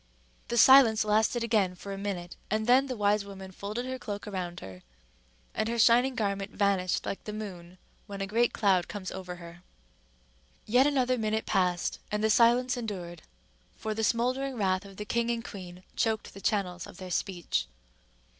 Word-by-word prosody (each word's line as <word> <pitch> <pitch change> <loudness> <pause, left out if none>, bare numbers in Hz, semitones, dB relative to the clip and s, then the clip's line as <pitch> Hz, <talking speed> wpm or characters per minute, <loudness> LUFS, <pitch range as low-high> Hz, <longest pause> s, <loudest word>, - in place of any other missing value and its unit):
The 235 - -2
silence 230 -3 +7
lasted 220 +3 +2
again 210 -6 +1
for 200 +2 -7
a - - -5
minute, 185 -4 -4
and 215 +1 0
then 255 +3 +5
the 255 -2 -4
wise 205 0 +2
woman 195 -1 -9
folded 210 +6 -5
her 260 0 -4
cloak 205 -4 -6
around 180 -4 -4
her, 95 -1 -10 0.7
and 220 - -1
her 235 - -1
shining 245 +3 +5
garment 200 -3 -1
vanished 195 -3 0
like 195 - -4
the 210 - -4
moon 185 -4 -8 0.3
when 200 -1 -7
a 195 - -1
great 230 +4 +2
cloud 190 -4 +2
comes 200 -3 -6
over 180 -1 -6
her. 170 0 -12 1.0
Yet 250 +5 +4
another 255 -3 +1
minute 220 0 -1
passed 180 -3 0
and 210 0 -1
the 220 - +3
silence 240 +3 +4
endured, 180 -8 -5 0.5
for 220 0 -3
the 220 +1 -2
smouldering 255 +4 0
wrath 190 -3 0
of 195 -1 -13
the 210 - -5
king 235 +2 0
and 235 0 -2
queen 180 -2 -9
choked 220 -2 -1
the 195 - -11
channels 180 -4 -1
of - - -13
their 185 -2 -8
speech. 175 0 -1
210 Hz, 180 wpm, -29 LUFS, 185-230 Hz, 1.0 s, silence